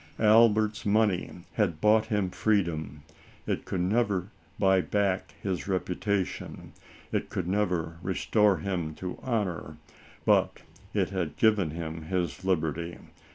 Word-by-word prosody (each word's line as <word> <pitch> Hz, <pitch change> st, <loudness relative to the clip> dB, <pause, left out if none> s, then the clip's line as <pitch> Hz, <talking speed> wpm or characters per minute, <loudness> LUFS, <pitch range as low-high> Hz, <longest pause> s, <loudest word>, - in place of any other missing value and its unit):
Albert's 110 Hz, 0 st, +4 dB
money 105 Hz, -3 st, +2 dB, 0.2 s
had 90 Hz, -8 st, 0 dB
bought 110 Hz, +2 st, +4 dB
him 105 Hz, -5 st, 0 dB
freedom. 80 Hz, -10 st, 0 dB, 0.4 s
It -, -, -2 dB
could 90 Hz, -, -2 dB
never 100 Hz, -1 st, +1 dB, 0.3 s
buy 95 Hz, -1 st, +4 dB
back 100 Hz, -1 st, -1 dB
his 95 Hz, -2 st, -2 dB
reputation, 95 Hz, +1 st, -2 dB, 0.4 s
it -, -, -1 dB
could 90 Hz, -, -3 dB
never 90 Hz, -4 st, -1 dB
restore 100 Hz, +2 st, +2 dB
him 80 Hz, -2 st, -3 dB
to 90 Hz, +2 st, -6 dB
honor, 105 Hz, -9 st, -2 dB, 0.5 s
but -, -, +2 dB, 0.3 s
it -, -, 0 dB
had 85 Hz, -6 st, -3 dB
given 105 Hz, -7 st, +3 dB
him 80 Hz, 0 st, -5 dB
his 90 Hz, +1 st, -2 dB
liberty. 85 Hz, -2 st, -1 dB
95 Hz, 120 wpm, -28 LUFS, 85-105 Hz, 0.5 s, Albert's